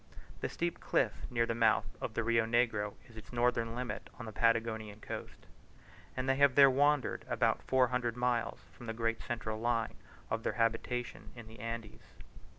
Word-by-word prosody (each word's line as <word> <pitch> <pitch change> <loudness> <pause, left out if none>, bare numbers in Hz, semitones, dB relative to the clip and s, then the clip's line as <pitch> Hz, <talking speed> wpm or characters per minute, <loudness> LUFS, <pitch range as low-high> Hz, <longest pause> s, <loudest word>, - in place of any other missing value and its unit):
The - - -2
steep 170 0 -2
cliff - - 0
near 115 -1 +2
the 115 - -1
mouth 115 -1 +3 0.2
of 110 - -4
the 115 - +1
Rio 115 0 +2
Negro 115 -3 +1
is 115 - -17
its 110 - -11
northern 120 -1 +1
limit 125 0 -4
on 115 - -7
the 110 - -6
Patagonian 110 -1 +1
coast; - - -7 0.7
and 130 +1 -1
they 135 0 +3
have 140 -2 +5
there 140 -1 +8
wandered 145 +1 +2
about - - +2
four 130 -1 +3
hundred 125 -2 -1
miles 120 -1 0
from 120 - -12
the 115 - -2
great 115 -1 0
central 110 -2 -3
line 115 -1 0 0.4
of 115 - 0
their - - -1
habitations 120 +1 -2
in 120 - -8
the 110 +1 -13
Andes. 115 -1 -7
115 Hz, 180 wpm, -33 LUFS, 115-125 Hz, 0.7 s, there